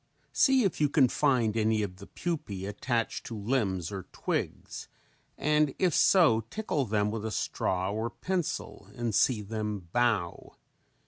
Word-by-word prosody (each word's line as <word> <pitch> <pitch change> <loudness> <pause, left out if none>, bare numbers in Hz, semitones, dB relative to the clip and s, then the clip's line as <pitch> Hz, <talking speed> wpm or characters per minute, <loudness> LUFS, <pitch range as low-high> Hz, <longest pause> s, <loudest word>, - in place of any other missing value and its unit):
See 265 -3 +4
if 190 -6 -1
you 145 - +4
can 135 -3 +4
find 125 -7 +2
any 110 -1 +2
of 90 -2 -5
the 100 - -11
pupae 105 - -4
attached 115 +3 -2
to 115 - -6
limbs 100 -6 -1
or 95 -3 -6
twigs - - -4 0.5
and 150 -1 +2
if 180 -4 +2
so, 155 - +5
tickle 155 - -1
them 105 -1 0
with 110 -1 -4
a 110 - -2
straw 95 -3 -1
or 110 +2 -2
a - - -5
pencil 180 +6 -3
and 120 -2 -2
see 110 +1 +2
them 105 -4 -4
"bow." 110 -8 0
115 Hz, 155 wpm, -29 LUFS, 105-145 Hz, 0.5 s, so